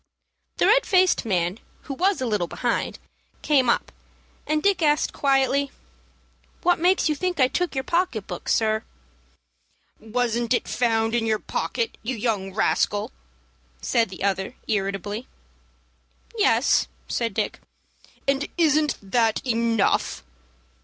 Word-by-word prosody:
The - - +3
red - - +5
faced 370 - +3
man, 180 -1 0 0.2
who 275 - -6
was 370 +4 +1
a - - 0
little 210 -7 0
behind, 240 +6 -2 0.5
came 270 -5 +3
up, - - +1 0.6
and 305 0 0
Dick 400 -3 +2
asked, 300 -1 +2
quietly, 275 0 +2 0.9
"What 355 -1 +3
makes 360 +2 +3
you 310 - +2
think 355 +2 -2
I 260 - +6
took 355 +3 -2
your 265 - -1
pocket 335 - 0
book, 175 - -6
sir?" 220 0 +2 1.2
"Wasn't 235 +1 0
it - - -2
found 225 -2 +1
in 230 -1 +1
your 220 -1 +2
pocket, 460 - -3
you 255 +3 -3
young 210 -4 -1
rascal?" 205 0 0 0.7
said 230 - +1
the 185 0 -8
other, 195 +3 -1
irritably. 205 +2 -2 1.1
"Yes," - - +3 0.2
said 230 -4 -2
Dick. 215 -2 -2 0.7
"And 275 +1 +1
isn't 310 -2 +3
that 225 +3 +1
enough?" 230 - +1
240 Hz, 130 wpm, -24 LUFS, 215-295 Hz, 1.2 s, I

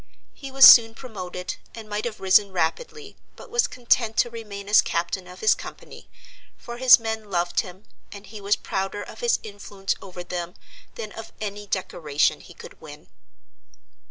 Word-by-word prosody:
He 275 - -10
was 270 0 +7
soon 225 -2 +9
promoted, 185 -8 -7 0.2
and 225 -2 -10
might 210 +1 -4
have 230 -3 -5
risen 195 +1 +3
rapidly, 415 - -3 0.2
but - - -14
was 475 0 +2
content 235 -2 0
to 240 - +2
remain 205 -4 -8
as 210 - +6
captain 175 +2 -3
of 180 +1 -13
his 215 - +5
company; - - -11 0.5
for 240 0 -9
his 255 0 +8
men 220 -2 -5
loved 175 -2 -1
him, 190 0 -6 0.3
and 200 0 -11
he 215 -1 -11
was 200 +1 +2
prouder 195 +2 -4
of - - -12
his 475 -1 +2
influence 200 -2 -5
over 180 -2 -9
them 175 +1 -6 0.4
than 215 -2 -7
of 225 - -10
any 205 -1 -6
decoration 155 -6 -1
he - - -15
could - - -13
win. - - -13
205 Hz, 170 wpm, -24 LUFS, 185-230 Hz, 0.5 s, soon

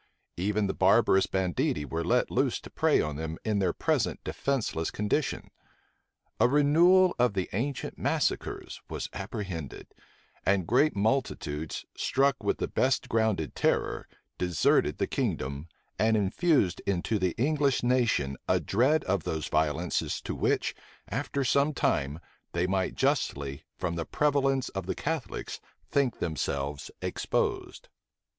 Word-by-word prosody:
Even 105 +3 0
the 95 - -1
barbarous 95 0 +4
banditti 90 -5 0
were 80 +3 -3
let 85 - +1
loose - - +1
to - - -12
prey - - +3
on 75 -2 -3
them 80 +1 -4
in 105 -2 +1
their 95 -3 +2
present - - 0
defenceless 120 -12 -1
condition. 105 +8 -1 0.9
A - - +6
renewal 165 +7 +5
of 120 -4 +3
the 95 -2 -1
ancient 130 +7 -3
massacres - - -1
was - - -4
apprehended; 95 - -6 0.5
and 95 -2 +2
great 130 - +3
multitudes, 100 - -1
struck 135 +1 +1
with - - +1
the - - -2
best 130 0 +1
grounded 110 - +1
terror, - - 0 0.3
deserted 90 -3 +2
the - - +1
kingdom, 70 +4 -2 0.3
and 110 0 +3
infused 105 - +2
into 100 +3 0
the 90 -2 0
English 140 +1 +1
nation 115 - +1
a - - +3
dread 130 +10 +2
of 95 +1 0
those 80 -1 -3
violences 80 +3 0
to - - -4
which, - - 0 0.4
after 140 - -2
some 140 +3 +2
time, 70 - 0 0.3
they 85 +1 +1
might 95 0 0
justly, 70 - -1
from 90 -1 -2
the 80 - -2
prevalence 135 -3 +1
of 95 - -5
the - - -1
Catholics, 160 -3 -4 0.3
think 135 -4 +1
themselves 70 -3 -3
exposed. - - -2
100 Hz, 135 wpm, -28 LUFS, 85-135 Hz, 0.9 s, A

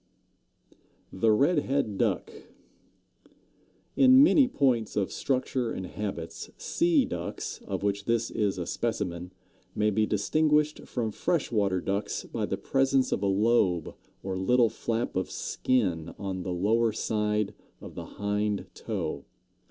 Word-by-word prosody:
THE 110 +4 +3
RED 145 +9 +3
HEAD 135 -8 -1
DUCK. - - 0 1.6
In 260 0 +7
many 290 -3 +5
points 130 - +1
of 100 -2 0
structure 130 -2 -1
and 95 - -4
habits 95 -4 -5
Sea 330 -5 +2
Ducks, - - -5
of - - -3
which 100 0 -1
this 115 0 0
is 105 -3 0
a 90 - -3
specimen, 90 -4 -3 0.4
may 105 0 +2
be 110 +1 +1
distinguished 150 +8 +1
from 115 -3 -2
Fresh 160 +7 -1
Water 100 -5 +1
Ducks 100 +3 -2
by - - -3
the - - -2
presence 135 -1 +1
of - - 0
a 100 - +1
lobe 100 -4 +2 0.3
or 95 -1 -3
little 120 +4 +3
flap 115 +1 -3
of 95 0 -1
skin 90 -11 -1
on 95 -2 -4
the 90 - -4
lower 110 +6 +2
side 105 -1 -1 0.3
of - - -10
the - - -7
hind 105 0 -1
toe. - - -4
105 Hz, 135 wpm, -28 LUFS, 100-130 Hz, 1.6 s, In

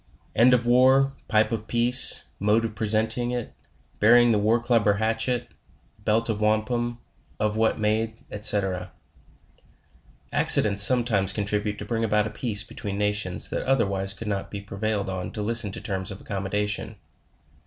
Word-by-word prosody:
End 120 +3 +4
of 125 -1 +1
War 130 +3 +3 0.2
Pipe 110 +1 +1
of 110 -1 -5
peace 120 +2 +7
Mode 105 +3 +1
of 110 - -6
presenting 110 +3 -1
it 120 -2 -5 0.5
rying 120 +2 +5
the 105 - +1
War 110 +3 +1
Club 115 -3 0
or 105 - +4
Hatchet 115 +3 -3 0.5
Belt 110 +2 0
of 110 -2 -3
Wampum 120 +3 -1 0.4
Of 105 0 -1
what 110 0 0
made 110 +1 -3
&LC. 100 -3 -1 1.4
Accidents 100 -1 +5
sometimes 110 -4 +3
contribute 105 0 -3
to - - -8
bring 115 -1 -3
about 105 -1 0
a 110 - -6
peace 110 -4 +1
be - - -12
tween 100 -2 -6
nations 105 -3 -2
that - - -3
otherwise 100 -7 0
could 115 - -9
not 100 -2 -4
be 100 - -7
prevailed 100 +1 -4
on 95 -1 -5
to 105 - -5
lis 115 +2 -1
ten 100 - -6
to - - -5
terms 95 -2 -4
of 95 - -8
accommodation. 105 +1 -4
110 Hz, 165 wpm, -24 LUFS, 105-115 Hz, 1.4 s, peace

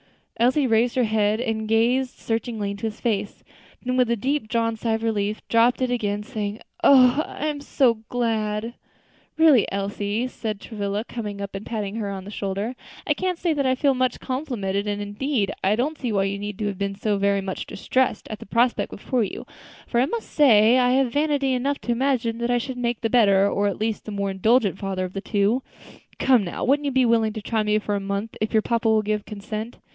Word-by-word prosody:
Elsie 255 +5 +3
raised 235 0 +2
her 255 - +3
head 215 -1 +1
and 225 -3 -2
gazed 245 +4 +2
searchingly 225 -3 -2
into 200 +2 -4
his 215 - -7
face; 205 -3 -2 0.4
then 255 0 -1
with 250 -2 +3
a 235 - +2
deep 265 +3 -1
drawn 230 0 0
sigh 225 0 -1
of 225 0 -2
relief, 210 -1 -1
dropped 235 +2 +3
it 255 - 0
again, 210 -4 -1
saying, 210 0 -4 0.2
"Oh! 260 +1 +6
I 300 - -6
am 295 -2 -2
so 250 -5 +2
glad." 225 -2 -1 0.6
"Really, 315 -5 +7
Miss - - 0
Elsie," 205 +3 -2
said 220 -4 -5
Travilla, 205 -1 -3
coming 210 -4 -6
up 200 0 -5
and 195 +1 -5
patting 215 -2 -4
her 210 -3 -2
on 195 -1 -5
the 200 - -9
shoulder, 200 +4 -3 0.3
"I 295 - +2
can't 365 +3 -2
say 340 -1 0
that 280 -3 0
I 260 - +3
feel 275 +1 +2
much 255 0 0
complimented; 220 -8 -2
and, 205 0 -2
indeed, 205 +1 -1
I 195 +2 +3
don't 285 +7 -1
see 245 -4 -2
why 195 -2 +2
you 195 0 -2
need 205 -1 -6
have 205 -3 -2
been 200 0 -2
so 205 0 -1
very 200 0 +2
much 190 -1 -5
distressed 260 +5 -1
at 215 - -6
the - - -11
prospect 235 +3 +1
before 250 -4 -1
you; 200 - -5 0.4
for 235 - 0
I 260 - +2
must 460 +7 -5
say 240 -4 +5
I 250 0 +3
have 260 -2 +2
vanity 285 -3 +1
enough 275 +3 0
to 240 - -2
imagine 235 -2 0
that 235 0 -1
I 245 - +3
should 250 +2 -4
make 240 -1 -1
the 225 - -1
better 200 -5 +5
or 205 0 +1
at 200 - -3
least 220 0 -2
the 215 - -6
more 200 -1 -2
indulgent 205 +1 +2
father 190 -2 -2
of 185 - -8
the 195 - -4
two. 205 +4 +1 0.6
Come, 250 -5 +4
now, 175 - -5
wouldn't 290 +3 +2
you - - 0
be 260 -1 +3
willing 225 -2 +2
to 215 - -5
try 220 +1 0
me 210 0 +2
for 210 -1 -2
a 200 - 0
month, 200 +2 -3
if 215 - 0
your 220 -1 +3
papa 230 -1 +1
will 220 -1 +3
give 210 0 -1
consent?" 215 +2 -6
225 Hz, 220 wpm, -24 LUFS, 205-250 Hz, 0.6 s, Really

